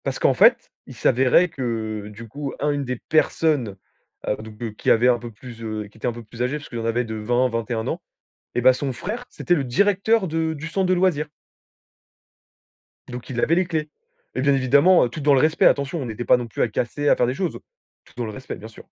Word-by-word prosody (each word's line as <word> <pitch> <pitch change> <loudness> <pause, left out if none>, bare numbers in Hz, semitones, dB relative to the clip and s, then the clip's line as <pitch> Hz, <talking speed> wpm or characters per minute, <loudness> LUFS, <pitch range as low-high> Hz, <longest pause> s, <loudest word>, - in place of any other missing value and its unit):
Parce - - -2
qu'en - - +4
fait, - - +4 0.2
il - - -11
s'avérait 130 +8 +3
que, 110 -6 -4
du 115 +2 -10
coup, 140 +4 -6
un 145 +1 +1
une 145 -1 -2
des 125 0 -2
personnes, 150 -8 +1 0.5
heu, - - +1
donc 110 0 -8
qui - - -2
avait 120 +2 +5
un 120 -1 +3
peu 120 0 -8
plus, 115 +1 -12
heu 110 -1 -4
qui 105 - -20
était 110 - -3
un - - +1
peu 120 0 -9
plus 115 +2 -10
âgée, 125 +4 0
puisqu'il 135 -5 -7
en 115 - -4
avait 115 +2 +1
de 110 -2 -6
20-21 115 0 -1
ans. - - -3 0.5
Et 125 - +1
bah, 130 +1 +6
son 135 +1 -3
frère, 215 - -5
c'était 175 - 0
le 145 - 0
directeur 200 - +2
de 160 0 -1
du 155 +1 -6
centre 190 +3 0
de 185 - +3
loisirs 175 -5 +1 1.8
donc 125 0 -8
il 125 -2 -3
avait 165 - +3
les 185 +1 +2
clés. 160 -3 -2 0.5
Et - - -1
bien 140 +1 +3
évidemment 145 +8 +5
heu, - - -3
tout 140 +6 -7
dans 145 0 +4
le 135 - +5
respect, 155 +1 +3
attention! 140 +3 +2
On 125 - -4
était 110 +2 -4
pas - - +5
non 120 -1 -5
plus 110 - -4
à - - +3
casser, 125 +6 -1
à - - +6
faire 125 - +1
des 125 - 0
choses! 175 +4 -3 0.5
Tout - - -21
dans 120 - -2
le 110 - -5
respect, 130 +5 -7
bien 110 - -10
sûr 115 - -14
125 Hz, 235 wpm, -23 LUFS, 115-155 Hz, 1.8 s, bah